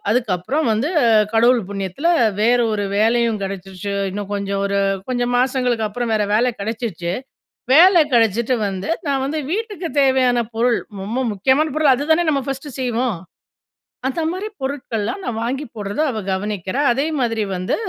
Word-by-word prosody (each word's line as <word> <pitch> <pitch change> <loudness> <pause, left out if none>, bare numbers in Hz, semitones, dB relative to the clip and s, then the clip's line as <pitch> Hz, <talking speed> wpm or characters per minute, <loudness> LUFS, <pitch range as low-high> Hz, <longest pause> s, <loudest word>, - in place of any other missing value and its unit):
அதுக்கப்புறம் 240 - 0
வந்து, 225 +7 0 0.4
கடவுள் 235 +2 +4
புண்ணியத்துல 195 - -2 0.3
வேற 240 +3 +4
ஒரு 205 -1 -1
வேலையும் 230 +1 +2
கிடைச்சுருச்சு. 195 0 -5 0.2
இன்னும் 205 +1 -5
கொஞ்சம் 200 0 -2
ஒரு 200 0 -1 0.3
கொஞ்சம் 245 -1 -1
மாசங்களுக்கப்புறம் 245 -3 0
வேற 210 -1 +1
வேல 245 +3 +2
கிடைச்சுருச்சு. 210 -5 -3 0.6
வேல 350 +4 +7
கிடைச்சிட்டு 230 +1 +3
வந்து 190 -1 -4 0.2
நான் 275 -2 0
வந்து 300 +3 -2
வீட்டுக்கு 415 -4 -3
தேவையான 260 -2 +3 0.2
பொருள். 235 +1 +2 0.2
ரொம்ப 225 +6 -2
முக்கியமான 265 +9 +2
பொருள். 305 -3 +5
அதுதான 315 +6 +1
நம்ம 280 -3 +1
ஃபஸ்ட்டு 275 0 -5
செய்வோம்? 245 -3 -1 0.9
அந்த 270 +5 -2
மாரி 380 +4 -4
பொருட்கள்லாம் 265 - -3
நான் 230 -3 -3
வாங்கி 265 +5 -2
போட்றதா 205 +6 -2
அவ 220 - -4
கவனிக்கிறா. 200 +4 -2
அதே 275 +5 0
மாதிரி 230 -3 0
வந்து 180 0 -1
240 Hz, 140 wpm, -20 LUFS, 205-270 Hz, 0.9 s, வேல